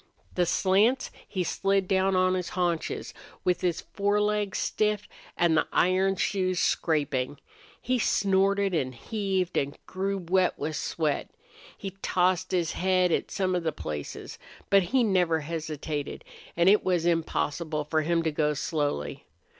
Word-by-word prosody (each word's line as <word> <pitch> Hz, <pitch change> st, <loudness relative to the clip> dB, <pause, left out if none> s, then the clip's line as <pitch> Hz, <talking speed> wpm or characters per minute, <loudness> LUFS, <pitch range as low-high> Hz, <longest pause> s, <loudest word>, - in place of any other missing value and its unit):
The 180 Hz, -1 st, +1 dB
slants 205 Hz, +10 st, +2 dB, 0.2 s
he 185 Hz, -3 st, -2 dB
slid 195 Hz, +2 st, 0 dB
down 190 Hz, 0 st, +2 dB
on 185 Hz, 0 st, +3 dB
his 180 Hz, -2 st, -2 dB
haunches 175 Hz, -3 st, -1 dB, 0.3 s
with 180 Hz, -1 st, +1 dB
his 175 Hz, -2 st, 0 dB
forelegs 205 Hz, 0 st, 0 dB
stiff 210 Hz, -1 st, 0 dB, 0.3 s
and 170 Hz, -2 st, +3 dB
the -, -, +2 dB
iron 190 Hz, +2 st, +3 dB
shoes 185 Hz, -2 st, 0 dB
scraping. 145 Hz, -4 st, 0 dB, 0.4 s
He 255 Hz, 0 st, 0 dB
snorted 195 Hz, -1 st, +2 dB
and 130 Hz, -6 st, -1 dB
heaved 190 Hz, -, -2 dB
and 140 Hz, +1 st, -1 dB
grew 195 Hz, +1 st, -2 dB
wet 185 Hz, 0 st, +1 dB
with 155 Hz, +1 st, -3 dB
sweat. 150 Hz, -2 st, -1 dB, 0.5 s
He 195 Hz, -, -5 dB
tossed 185 Hz, 0 st, +1 dB
his 175 Hz, -3 st, +1 dB
head 185 Hz, -1 st, +2 dB
at -, -, 0 dB
some 185 Hz, -1 st, -1 dB
of 180 Hz, -, +1 dB
the 160 Hz, -1 st, -1 dB
places. 75 Hz, -, -6 dB, 0.3 s
But 200 Hz, 0 st, +7 dB
he 260 Hz, -1 st, +3 dB
never 180 Hz, -6 st, +2 dB
hesitated 155 Hz, -2 st, -4 dB, 0.3 s
and 170 Hz, +1 st, +4 dB
it 205 Hz, +2 st, +6 dB
was 180 Hz, -3 st, +1 dB
impossible 160 Hz, -2 st, 0 dB
for 155 Hz, +1 st, 0 dB
him 165 Hz, +2 st, +1 dB
to 160 Hz, -, 0 dB
go 150 Hz, 0 st, 0 dB
slowly. 145 Hz, -, -2 dB
180 Hz, 145 wpm, -27 LUFS, 160-195 Hz, 0.5 s, But